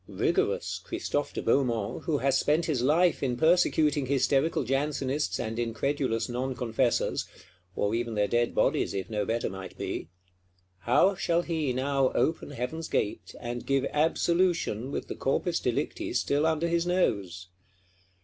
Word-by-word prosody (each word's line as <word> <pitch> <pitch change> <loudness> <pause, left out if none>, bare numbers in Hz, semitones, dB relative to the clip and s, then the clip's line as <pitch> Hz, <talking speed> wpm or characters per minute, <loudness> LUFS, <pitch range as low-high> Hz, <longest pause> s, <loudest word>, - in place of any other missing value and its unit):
Rigorous 430 +5 0
Christophe 345 - -2
de - - -5
Beaumont, 120 -7 0
who 160 -4 +1
has 135 -1 +1
spent 150 +4 +2
his 145 -7 0
life 160 +7 +3
in 125 -3 -1
persecuting 155 -3 +3
hysterical 135 +3 +2
Jansenists 135 +2 -1
and 115 +1 -3
incredulous 120 0 -1
Non 130 +2 -3
confessors; 120 0 0 0.5
or 105 +1 0
even 115 -1 -2
their 105 -1 +2
dead 120 +1 0
bodies, - - +1
if 95 +4 -4
no 105 -1 -1
better 115 +1 0
might 95 0 -8
be,—how 90 - -2
shall 175 -2 0
he 160 -6 -1
now 135 +1 +1
open 160 - 0
Heaven's 145 +4 -4
gate, 105 - -2
and 120 0 -5
give 135 0 +1
Absolution 165 - +1
with - - -4
the - - -4
corpus - - 0
delicti - - -2
still 145 +3 +1
under 160 +1 +1
his 170 +1 0
nose? 95 - 0
135 Hz, 145 wpm, -28 LUFS, 115-160 Hz, 0.5 s, life